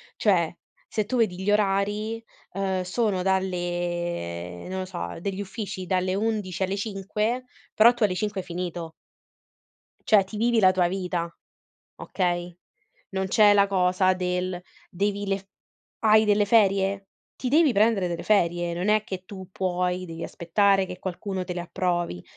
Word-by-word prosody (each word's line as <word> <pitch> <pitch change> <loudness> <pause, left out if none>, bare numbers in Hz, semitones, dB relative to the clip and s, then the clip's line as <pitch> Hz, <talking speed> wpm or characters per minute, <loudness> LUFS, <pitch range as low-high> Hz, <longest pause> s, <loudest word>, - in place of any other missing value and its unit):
cioè 175 -6 +2 0.4
se 215 -1 -1
tu 250 +4 -2
vedi 190 -6 +1
gli 205 - +2
orari, 210 +2 0 0.3
uhm, 190 -1 -1
sono 190 0 0
dalle 175 - -2
non 190 0 -4
lo 185 - -3
so, 85 - -5
degli 195 0 -3
uffici 195 -2 -5
dalle 185 0 0
11 205 -4 -1
alle 195 +2 -1
5, 210 +4 -2 0.3
però 235 +3 +7
tu 240 -2 -2
alle 185 -3 +2
5 210 0 -2
hai 180 - -16
finito. 175 -2 -4 1.2
Cioè 210 -4 +6
ti 205 +3 -9
vivi 230 +1 +2
la 185 -1 +6
tua 180 -2 +2
vita. 175 -2 -3 0.6
Okay. 175 -2 -2 0.6
Non 190 0 -1
c'è 205 +1 +5
la 200 -1 +5
cosa 185 -1 +2
del 180 0 -2 0.3
devi 200 +2 -1
le 195 0 0
f 195 - -18 0.5
hai 215 0 +5
delle 205 0 +3
ferie? 195 -2 +2 0.3
Ti 255 - -3
devi 300 0 +4
prendere 210 -3 +3
delle 170 -1 -4
ferie, 175 -4 +1
non 180 +4 -2
è 215 0 +4
che 185 -2 -6
tu 190 -1 -10
puoi 180 -1 -1
dei 165 0 -7
aspettare 195 +3 +2
che 180 - -8
qualcuno 185 +1 -4
te 180 - -4
le 175 - -3
approvi 175 - -2
190 Hz, 160 wpm, -25 LUFS, 180-205 Hz, 1.2 s, però